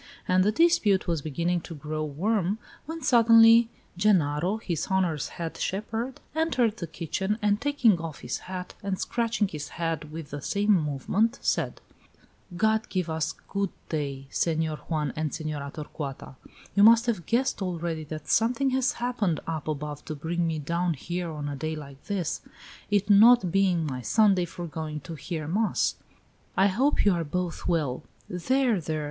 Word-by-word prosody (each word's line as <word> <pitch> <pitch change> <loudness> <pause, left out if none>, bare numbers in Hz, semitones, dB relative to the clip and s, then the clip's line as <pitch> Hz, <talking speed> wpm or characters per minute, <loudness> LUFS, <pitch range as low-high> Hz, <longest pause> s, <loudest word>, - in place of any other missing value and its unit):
And 185 0 +4
the 210 - +3
dispute 220 - +3
was 170 -4 -1
beginning 170 +4 -1
to 165 - -9
grow 155 +1 -4
warm, 190 +6 0 0.3
when 325 0 -6
suddenly 230 -2 +7 0.3
Genaro, 180 -1 +2
his 175 -8 -3
honor's 180 -6 0
head 165 -1 -4
shepherd, 225 +7 -3
entered 255 -9 +1
the 170 - -5
kitchen, 190 +6 -2
and 210 0 +1
taking 255 -10 +3
off 165 -3 -6
his - - -3
hat, 180 -1 -5
and 195 -3 -2
scratching 230 -3 0
his 150 -3 -6
head 160 -3 -2
with 160 -2 -7
the 145 0 -5
same 205 +8 +1
movement, 185 - +1
said: - - 0 0.8
"God 220 +2 +2
give 180 -4 -1
us 160 0 -1
good 200 -1 -1 0.2
day, 140 -3 -3
Senor 160 -2 0
Juan 150 0 -2
and 155 -1 -2
Senora 150 -3 -4
Torcuata! 145 -3 -7 0.4
You 200 - +3
must 230 +2 +7
have 220 -8 -2
guessed 240 -2 +1
already 170 -3 -2
that 155 +1 -7
something 250 +4 +2
has 260 0 +1
happened 230 -9 -1
up 160 -2 -4
above 150 -1 -4
to 155 - -5
bring 165 +3 -1
me 160 -1 -1
down 170 +3 -1
here 175 +5 -4
on 150 -2 -5
a 145 - -3
day 155 +3 -3
like 140 -2 -10
this, 190 -6 -2 0.5
it 205 0 +2
not 215 -2 +7
being 185 -4 +2
my 130 -4 -4
Sunday 195 - +3
for 175 +1 -7
going 155 -2 -5
to 155 +5 -8
hear 155 +1 -5
mass. 210 +7 +1 0.6
I 195 +1 +5
hope 260 +9 +2
you 200 - +5
are 170 -1 -1
both 175 +2 -3
well!" 155 -8 0 0.3
"There! 235 +3 +1
there! 155 0 -2
175 Hz, 165 wpm, -27 LUFS, 155-215 Hz, 0.8 s, suddenly